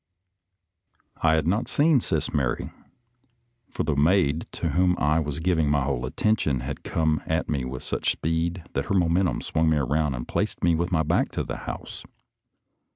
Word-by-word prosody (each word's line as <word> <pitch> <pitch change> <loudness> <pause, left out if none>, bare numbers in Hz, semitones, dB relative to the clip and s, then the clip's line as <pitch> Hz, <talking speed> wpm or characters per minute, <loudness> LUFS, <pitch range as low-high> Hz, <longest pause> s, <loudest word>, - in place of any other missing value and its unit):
I 80 -1 +4
had 80 -2 0
not 100 +7 +1
seen 150 -1 +3
Sis - - -2
Mary, 65 -4 -1 1.0
for - - -3
the 75 -1 0
maid 80 +1 +2
to - - -2
whom 90 0 +2
I 75 +2 +2
was 75 -1 -3
giving 80 -3 +1
my 75 -1 +2
whole 65 -2 -2
attention 75 - 0
had 70 +2 -5
come 80 -2 0
at 80 +2 0
me 70 -4 -1
with 65 0 -6
such - - 0
speed 85 +2 -2
that 70 - -1
her 100 - -1
momentum 90 +1 +2
swung 80 0 +1
me 80 - +3
around 75 +1 0
and - - -6
placed - - -2
me 85 - +4
with 85 +3 -1
my 80 -3 +2
back 80 - +1
to - - -1
the - - -5
house. - - -7
80 Hz, 180 wpm, -25 LUFS, 70-85 Hz, 1.0 s, I